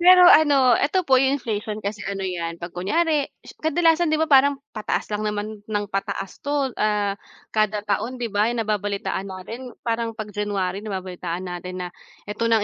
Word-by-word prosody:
pero 360 +1 +8
ano, 280 -5 +6
eto 370 +5 +1
po 260 -4 +5
yung 270 +1 +3
inflation 220 -4 -3
kasi 205 +1 -3
ano 195 -1 -3
yan 170 -2 -3
pag 170 +1 -8
kunyari 300 - +1 0.3
kadalasan 325 +1 +3
di 310 - +2
ba, 320 - +2
parang 280 -1 +5 0.2
pataas 215 0 -2
lang 210 - -1
naman 210 0 -3
ng 205 0 -2
pataas 195 -1 -3
'to 285 -3 -1
ah, 210 -1 +2 0.4
kada 215 -1 +1
taon 220 +5 -1
'di 235 -4 -4
ba, 210 +2 +3
yung 235 -1 -1
nababalitaan 205 -2 -2
natin 225 +7 -8
parang 230 -1 -1
pag 215 -2 -6
January 200 -2 -2
nababalitaan 185 -3 -5
natin 180 +1 -5
na 180 - -4 0.4
ito 210 +2 -3
na 225 -1 +5
215 Hz, 175 wpm, -23 LUFS, 200-265 Hz, 0.4 s, pero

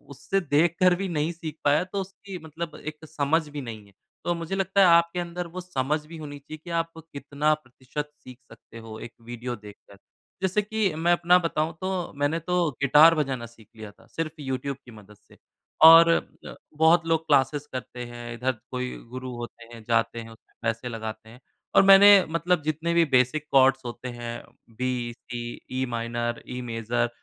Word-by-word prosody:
उससे 195 +9 -1
देख 165 +1 +2
कर 180 -1 +5
भी 195 +1 -3
नहीं 155 0 -1
सीख 160 -3 -7
पाया 145 +3 +3
तो 190 +2 -4
उसकी 195 0 -9
मतलब 160 +1 -6
एक 155 0 -7
समझ 155 +1 0
भी 145 0 -6
नहीं 110 -5 -8
है। 100 - -22 0.3
तो 175 - +1
मुझे 170 +3 -4
लगता 195 +1 +2
है - - +8
आपके 170 +1 +4
अंदर 175 0 -4
वो 180 +2 -7
समझ 150 -3 -2
भी 165 +1 -10
होनी 145 -2 -8
चाहिए 155 +3 -10
कि - - -10
आप 165 0 -1 0.2
कितना 145 +2 0
प्रतिशत 145 0 -7
सीख 125 -1 -12
सकते 115 0 -14
हो 110 -1 -9
एक 120 - -9
वीडियो 120 +1 -6
देख 105 -2 -12
कर। 100 - -15 0.4
जैसे 190 +2 +1
कि 210 -3 -1
मैं 170 +2 +1
अपना 175 +1 +4
बताऊँ 165 -1 -1
तो, 185 -2 -3
मैंने 145 +4 0
तो 175 -1 0
गिटार 150 +4 +7
बजाना 135 -6 -2
सीख 115 -2 -17
लिया 110 -2 -9
था, 115 +2 -23
सिर्फ़ 160 -1 -4
यूट्यूब 135 0 -3
की 120 - -13
मदद 105 -1 -15
से - - -23 0.5
और 165 +1 +10
अ, 165 - -2 0.2
बहुत 165 +1 +5
लोग 160 0 +1
क्लासेज़ 145 +1 +2
करते 125 -1 -6
हैं, 120 0 -8
इधर 125 +3 -1 0.2
कोई 125 0 -3 0.2
गुरु 130 0 -5
होते 120 -1 -8
हैं, 115 -2 -11
जाते 115 0 +1
हैं, 115 - -8
उसमें 115 0 -19
पैसे 115 +2 -2
लगाते 110 -1 -7
हैं। 120 +3 -14 0.4
और - - +8
मैंने 195 0 +8
मतलब 165 +1 +1
जितने 160 +2 -1
भी 170 -1 +4
बेसिक 125 +5 +2
कॉर्ड्स 135 0 +5
होते 120 +1 -6
हैं, 120 -1 -6 0.3
बी, 120 0 -3
सी, 120 -1 -7 0.2
ई-माइनर, 120 -1 -2
ई-मेजर, 120 -1 -2
145 Hz, 190 wpm, -26 LUFS, 120-170 Hz, 0.5 s, और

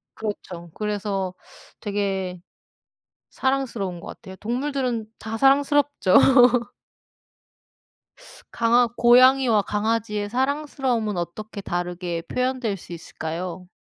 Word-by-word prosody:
그렇죠. 180 -5 -6
그래서 205 -3 -2 0.5
되게 195 -3 -2 0.9
사랑스러운 240 -9 -2
것 - - -10
같아요. 190 -2 -10
동물들은 245 0 -2
다 220 0 -5
사랑스럽죠. 280 -4 +3 2.4
강아 235 +1 +3
고양이와 245 -1 +5
강아지의 210 0 -1
사랑스러움은 260 -4 -1
어떻게 205 +5 -6
다르게 175 -2 -3
표현될 250 -4 -1
수 175 - -12
있을까요? 170 +2 -6
215 Hz, 250 characters per minute, -23 LUFS, 190-255 Hz, 2.4 s, 고양이와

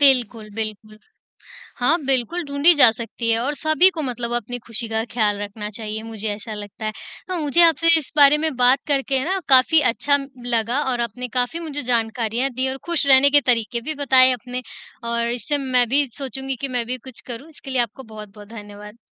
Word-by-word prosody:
बिल्कुल, 245 -6 +3
बिल्कुल। 215 -1 -6 0.8
हाँ, 275 +7 +3
बिल्कुल 270 +7 0
ढूँढी 285 +4 +4
जा 265 -6 +8
सकती 230 +1 -5
है 225 0 +2
और 280 +5 -2
सभी 310 +5 +4
को - - 0
मतलब 245 -4 -4
अपनी 240 +1 -3
खुशी 230 0 -4
का 220 0 -1
ख़्याल 210 -3 +1
रखना 210 +1 -6
चाहिए 220 -1 -6
मुझे 220 -1 -6
ऐसा 215 +1 -8
लगता 210 +1 -8
है। 215 - -1 0.4
अ, 370 - -2
मुझे 315 0 +2
आपसे 330 0 +3
इस 300 - -12
बारे 290 0 +7
में 310 -2 -2
बात 250 +2 +4
करके 275 -1 0
है 260 - -2
ना 380 +3 -1
काफ़ी 265 +4 +6
अच्छा 285 +4 +1
म 275 -1 -8 0.2
लगा 235 +2 0
और 245 -1 -1
आपने 240 +2 -4
काफ़ी 250 +7 0
मुझे 300 -3 -4
जानकारियाँ 235 +1 -1
दी 260 +2 -1
और 265 - -5
खुश 340 -4 0
रहने 270 +1 +6
के - - +4
तरीक़े 235 0 -2
भी 310 +6 -4
बताए 260 -1 +6
अपने, 250 0 -5 0.4
और 235 0 -1
इससे 245 +5 -2
मैं 255 -3 +1
भी 285 +3 +3
सोचूँगी 265 +1 -5
कि 275 - -2
मैं 235 - -1
भी 250 +2 -3
कुछ 255 -1 -10
करूँ 240 +7 -9
इसके 295 -3 -13
लिए 255 -2 +2
आपको 240 +3 -5
बहुत-बहुत 210 -2 -12
धन्यवाद। 210 -1 -11
245 Hz, 205 wpm, -21 LUFS, 225-280 Hz, 0.8 s, जा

